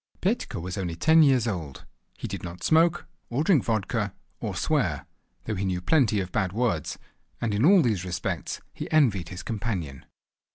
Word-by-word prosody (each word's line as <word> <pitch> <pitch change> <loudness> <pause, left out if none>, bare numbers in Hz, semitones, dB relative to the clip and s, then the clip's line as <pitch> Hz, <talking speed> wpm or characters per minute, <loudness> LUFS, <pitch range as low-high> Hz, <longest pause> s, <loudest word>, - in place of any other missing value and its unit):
Petka 190 - -1
was 90 +4 -4
only 85 -3 -3
ten 160 - +5
years 130 -6 +4
old. 80 - -5 0.3
He - - -5
did - - -5
not 85 +1 -8
smoke, 165 +2 +3 0.2
or 130 +5 0
drink 160 - +4
vodka, 110 -4 -1 0.2
or - - -4
swear, - - 0 0.4
though 110 - -3
he 100 -1 -2
knew 95 -2 -1
plenty 110 - +3
of 90 -2 -4
bad 95 -2 0
words, 120 0 -1 0.4
and 115 -3 -1
in 105 +3 +1
all 185 +2 +7
these 105 -8 0
respects 90 -1 -3
he - - -6
envied 110 - +3
his 90 -1 -7
companion. 95 - -4
105 Hz, 175 wpm, -26 LUFS, 90-135 Hz, 0.4 s, all